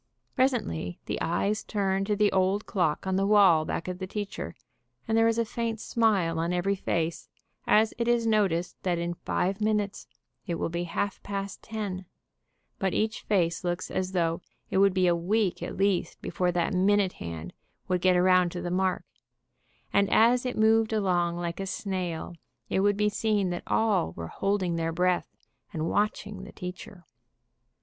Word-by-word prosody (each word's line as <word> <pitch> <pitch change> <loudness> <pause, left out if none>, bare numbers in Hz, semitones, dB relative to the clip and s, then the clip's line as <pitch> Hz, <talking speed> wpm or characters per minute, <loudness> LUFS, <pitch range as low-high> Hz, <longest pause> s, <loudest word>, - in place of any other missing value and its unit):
Presently 235 - 0
the - - -3
eyes 200 +5 0
turn 195 -2 0
to 210 0 0
the 210 0 +3
old 190 +2 +1
clock 175 -7 0
on 190 0 0
the 195 +1 +1
wall 190 -7 +5
back 165 - -3
of 180 0 -4
the 190 - -4
teacher, 200 - -5 0.5
and 225 - +1
there 225 0 +5
is 230 0 +1
a 230 - +2
faint 230 -1 -3
smile 200 -9 +1
on 165 +1 0
every 180 +3 +1
face 170 -3 -2 0.4
as 220 +1 +4
it 235 - 0
is 240 -1 +2
noticed 195 -6 +1
that 180 -2 0
in 170 0 -2
five 190 +3 -2
minutes 210 -1 -1 0.4
it 170 - -1
will 165 - -2
be 170 +1 -2
half 190 +4 -2
past 200 -1 -5
ten, 200 -5 -5 0.7
but 190 -2 0
each 220 +1 0
face 170 -5 0
looks 175 0 -2
as 185 0 -2
though 165 -1 0 0.3
it 190 - +2
would 195 -1 +4
be 185 -1 +3
a 175 -1 +4
week 190 +3 0
at - - -5
least 195 -1 0
before 180 -1 -1
that 175 0 0
minute 195 +1 +3
hand 85 0 -7 0.3
would 180 -1 0
get 185 0 +4
around 180 -1 +4
to 175 - -5
the 175 - -3
mark, 185 0 0 0.9
and 200 0 +3
as 245 +3 +4
it 250 - -4
moved 220 0 +4
along 175 -5 +1
like 170 0 -4
a 195 - -3
snail 185 -4 -3 0.4
it - - +1
would 205 +1 +3
be 210 0 +2
seen 210 -3 0
that 175 - -3
all 205 - +1
were 85 - -6
holding 190 -4 0
their 165 0 -1
breath, 180 +2 +1 0.4
and 160 0 -2
watching 205 -1 -1
the 200 - -10
teacher. 180 0 -8
190 Hz, 180 wpm, -28 LUFS, 175-210 Hz, 0.9 s, wall